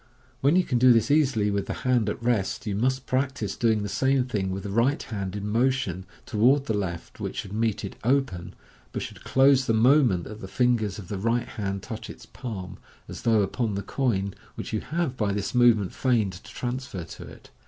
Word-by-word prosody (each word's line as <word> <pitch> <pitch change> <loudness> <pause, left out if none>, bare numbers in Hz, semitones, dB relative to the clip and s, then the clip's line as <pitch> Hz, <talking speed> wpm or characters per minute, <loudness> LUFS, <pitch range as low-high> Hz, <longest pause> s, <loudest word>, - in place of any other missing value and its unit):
When 140 +5 +3
you 185 - +5
can 125 -7 0
do 125 +1 +7
this 115 +2 +2
easily 130 -9 +3
with 100 -1 -1
the - - -3
hand 120 -4 +3
at - - -4
rest, 115 0 0
you 105 - -2
must 130 +4 0
practise 130 -6 -1
doing 110 -3 +2
the - - -2
same 130 +6 +1
thing 105 -7 -2
with 95 0 -4
the 100 - -5
right 120 +7 +2
hand 100 -3 -4
in 105 0 -4
motion 115 -5 0 0.2
toward 130 +6 +3
the 110 - -1
left, 95 -5 -4
which - - -4
should 100 - -5
meet 110 -1 0
it 100 - -7
open, 120 -9 0 0.4
but - - -3
should - - -9
close 135 -1 +4
the 115 - +3
moment 120 - +4
that 105 +3 -9
the 95 - -6
fingers 115 -3 +1
of 100 -5 -9
the 100 - -3
right 115 +3 0
hand 100 -3 -4
touch 110 +1 -7
its - - -10
palm, 105 -8 -7 0.3
as - - -8
though 110 -3 +3
upon 105 +2 -1
the 100 - -3
coin, 100 -8 -1 0.2
which - - -6
you 110 - +1
have 160 -2 -2
by 105 -4 0
this 100 0 -2
movement 120 -6 +4
feigned 115 -7 +1
to 90 - -12
transfer 125 -7 -4
to 80 - -10
it. - - -14
110 Hz, 215 wpm, -26 LUFS, 100-130 Hz, 0.4 s, do